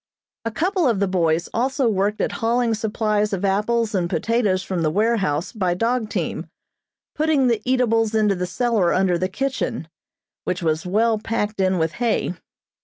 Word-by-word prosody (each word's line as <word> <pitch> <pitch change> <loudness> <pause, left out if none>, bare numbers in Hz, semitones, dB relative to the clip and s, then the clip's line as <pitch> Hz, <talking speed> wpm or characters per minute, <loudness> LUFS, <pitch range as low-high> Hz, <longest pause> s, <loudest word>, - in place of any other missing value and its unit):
A - - 0
couple 345 - 0
of 225 -6 +1
the 200 - +2
boys 170 -2 +1
also 260 +2 +1
worked 205 0 0
at - - 0
hauling 235 0 +2
supplies 215 -1 0
of 195 +1 -1
apples 215 +3 +1
and 180 -3 0
potatoes 195 +1 +1
from 185 -3 -3
the 155 - +2
warehouse 195 -4 0
by 185 -6 -1
dog 230 +2 0
team, - - -3 0.7
putting 305 -3 +2
the 230 -4 +1
eatables 230 -3 +2
into 210 -2 +3
the 180 -1 -3
cellar 215 -2 +1
under 185 -2 +2
the 185 +1 -1
kitchen, 255 -5 -3 0.6
which 180 0 -2
was 160 +2 0
well 220 +3 +2
packed 210 -2 -2
in 185 -1 +2
with 160 -1 0
hay. 230 -6 +1
210 Hz, 170 wpm, -22 LUFS, 185-235 Hz, 0.7 s, into